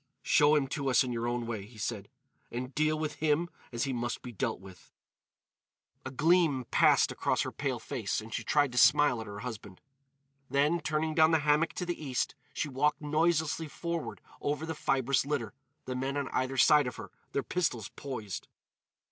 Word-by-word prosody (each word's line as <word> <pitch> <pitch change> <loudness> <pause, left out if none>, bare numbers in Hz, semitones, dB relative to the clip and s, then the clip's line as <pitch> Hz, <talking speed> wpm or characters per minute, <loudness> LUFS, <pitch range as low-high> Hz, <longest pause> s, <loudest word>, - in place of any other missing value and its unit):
"Show 150 +1 +5
him 145 -2 +2
to 140 -2 -2
us 125 -1 +5
in 125 - -3
your 115 0 -2
own 120 0 -1
way," 115 -4 -4
he 115 0 -16
said, 105 -1 -4 0.4
"and 125 +2 -5
deal 155 +2 +1
with 155 -1 -3
him 160 +3 +1 0.2
as 120 -1 -2
he 135 -2 -1
must 120 0 -3
be 125 - -7
dealt 100 - -2
with." 95 -2 -15 1.1
A - - -5
gleam 150 -1 +3
passed - - +5
across - - 0
her - - -4
pale - - -2
face - - -3
and 110 0 -9
she - - -2
tried 145 -3 +2
to 125 - +1
smile 145 -5 +5
at 110 - -8
her 100 0 -7
husband. 110 -6 -7 0.7
Then, 150 +5 +2
turning 155 +1 -1
down 155 0 +5
the 160 -2 +3
hammock 150 +2 +3
to 180 - -3
the 175 -2 -4
east, 130 -4 -1 0.2
she - - -2
walked 145 +2 +1
noiselessly 160 +1 +1
forward 170 +2 -4 0.2
over 150 +2 -1
the 160 - -3
fibrous 135 -3 +1
litter, 140 -6 -2 0.3
the 130 - -3
men 135 +2 -2
on 140 -2 -2
either 130 +1 -1
side 150 0 +6
of 125 - -5
her, 100 -5 -9 0.2
their 140 - 0
pistols 125 - -1
poised. 110 - -6
140 Hz, 190 wpm, -30 LUFS, 120-155 Hz, 1.1 s, side